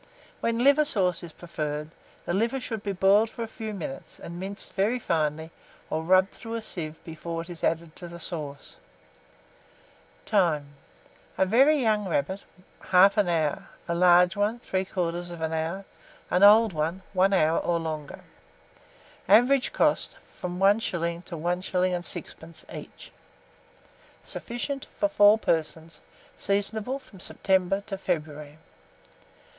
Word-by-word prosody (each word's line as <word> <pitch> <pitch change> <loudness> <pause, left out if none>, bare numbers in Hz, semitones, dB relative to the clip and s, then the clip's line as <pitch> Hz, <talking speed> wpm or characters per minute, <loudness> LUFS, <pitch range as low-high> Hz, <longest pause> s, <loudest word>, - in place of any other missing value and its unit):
When 230 +1 0
liver 285 +3 +6
sauce 185 - +1
is 170 - -9
preferred, 150 -2 -5 0.3
the - - -2
liver 230 +7 0
should 225 -4 -5
be 205 - -3
boiled 195 +3 +4
for 230 - -6
a - - -5
few 220 -1 -6
minutes, 165 -9 -7
and 170 +1 -8
minced 195 +2 -5
very 205 +6 +1
finely, 160 -6 -1 0.4
or 160 - 0
rubbed 185 +3 +4
through 230 -1 -7
a 230 - -4
sieve 160 -6 -3
before 165 +1 -5
it 175 - -11
is 170 - -10
added 165 -1 -1
to 175 - -7
the 170 0 -9
sauce. 150 -5 -7 1.5
Time. 165 -9 +1 0.7
A 190 - +3
very 270 +10 +5
young 215 -6 +1
rabbit, 175 +5 -2 0.4
1/2 195 +2 +5
hour; 160 -4 -1 0.2
a 170 - -1
large 180 +1 +5
one, 210 +4 0
3/4 175 -4 -3
hour; 165 +5 -3 0.5
an 180 - +2
old 210 +1 +7
one, 165 +4 -2
1 190 +1 +3
hour 165 -4 +3
or 170 - 0
longer. 155 -3 -5 1.1
Average 250 +6 +5
cost, - - +1
from 180 -1 -7
1s. 180 -4 +1
to 170 - -7
1s. 180 +1 -2 0.2
6d. - - -13
each. - - -10 1.1
Sufficient 265 +3 -5
for 305 - +2
4 215 -8 +6
persons. 160 -4 -2 0.3
Seasonable 210 +5 -1
from 255 -8 -16
September 190 +1 0
to 195 -2 -7
February. 150 -3 -4
185 Hz, 135 wpm, -26 LUFS, 165-210 Hz, 1.5 s, old